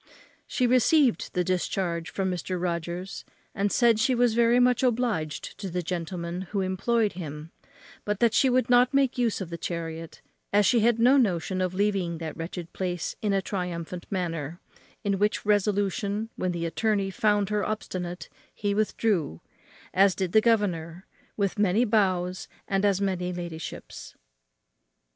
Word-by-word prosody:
She 255 - 0
received 255 +2 +3
the 180 - +2
discharge 175 -2 -1
from 190 -1 -1
Mr. 180 +1 -3
Rogers, 175 +2 -3 0.3
and 200 +1 0
said 235 -3 +4
she 250 +3 +2
was 240 -1 +3
very 235 +1 +4
much 250 -1 +3
obliged 235 - -1
to 195 - -4
the 180 0 -2
gentleman 175 +1 -4
who 200 -2 -1
employed 205 +4 +1
him, 155 -2 -7 0.5
but 210 -1 -2
that 235 -2 +3
she 265 - +4
would 250 -1 +2
not 245 +1 +4
make 270 -2 +2
use 230 -4 +1
of 175 -3 -6
the 170 - -5
chariot, 165 -1 -5 0.3
as 205 0 +4
she 235 +5 +4
had 230 +1 +3
no 250 +4 +5
notion 185 -5 +1
of 185 0 -1
leaving 195 -4 0
that 160 -1 -5
wretched 170 +1 -6
place 180 -2 -3
in 210 - 0
a 195 -1 +1
triumphant 180 -2 -4
manner; 170 -4 -3 0.4
in 200 -2 0
which 210 +1 +1
resolution, 205 +1 0
when 185 - -1
the 170 -1 -3
attorney 200 +2 0
found 205 0 +1
her 210 -1 0
obstinate, 180 -4 -4 0.3
he 205 -1 -1
withdrew, 205 - 0 0.5
as 195 0 +4
did 185 -3 -2
the 220 - +5
governor, 185 -6 0 0.3
with 200 -1 -1
many 205 +4 +3
bows 185 -4 +1 0.2
and 195 +1 +1
as 200 -2 +3
many 185 -2 -1
ladyships. 170 -2 -7
195 Hz, 155 wpm, -27 LUFS, 175-215 Hz, 0.5 s, no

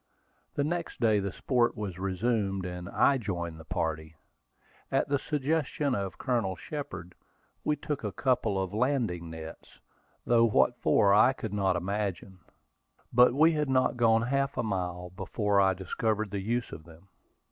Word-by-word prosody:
The 145 - +1
next 170 +3 -3
day 110 -3 +3
the 100 -1 -2
sport 120 +3 +1
was 95 -4 -5
resumed, 95 0 -1
and 90 -1 -6
I 140 -1 +3
joined 85 -7 -4
the 80 - -12
party. 80 -1 -3 0.8
At 135 - +1
the 140 -1 +1
suggestion 150 -1 -1
of 100 -4 -3
Colonel 115 -8 -1
Shepard, 90 - -7 0.5
we 150 - +1
took 145 -1 -4
a 105 - -2
couple 110 -2 0
of 95 0 -3
landing 110 -8 0
nets, 80 0 -10 0.5
though 115 -1 +4
what 70 -12 +3
for 100 -1 +4
I 110 +6 +6
could 110 -6 -6
not 95 -3 +1
imagine. 95 0 -3 0.7
But 125 +1 +6
we 160 +3 +5
had 150 -3 -1
not 130 -1 +2
gone 115 -2 +3
half 140 +2 -1
a 120 - 0
mile 90 -4 -3
before 100 +1 0
I 95 -1 +3
discovered 105 +3 -2
the 100 -1 -3
use 120 +4 -2
of 80 - -9
them. 85 +3 -16
105 Hz, 160 wpm, -29 LUFS, 95-125 Hz, 0.8 s, I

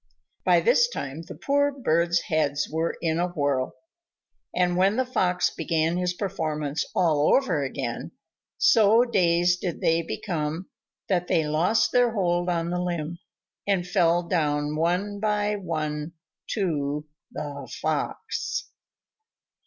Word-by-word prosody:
By - - +4
this 480 0 +4
time 140 - -5
the 165 - -10
poor 285 +1 +1
birds' 170 - +1
heads 150 -3 0
were 160 +2 -2
in 160 0 +1
a 175 - +1
whirl. 145 -6 -1 0.8
And 180 0 +1
when 190 +3 +3
the 260 +1 +1
Fox 180 -8 +1
began 165 +1 0
his 180 0 -1
performance 155 -6 -2
all 155 -4 +3
over 270 0 +1
again, - - -4 0.5
so 225 +1 +5
dazed 175 -5 +2
did 175 -3 -3
they 165 +1 +2
become, 165 - -4 0.4
that 180 -2 0
they 165 -4 +2
lost 170 +9 +2
their 245 -2 +3
hold 175 -2 +1
on 170 -1 -1
the 180 0 -1
limb, 170 -2 -3 0.5
and 190 -3 +1
fell 175 0 +3
down 150 -3 0
one 180 +6 0
by 210 0 0
one 155 -3 -3 0.4
to 150 -7 -1 0.3
the 140 -2 -6
Fox. - - -2
175 Hz, 130 wpm, -25 LUFS, 155-190 Hz, 0.8 s, so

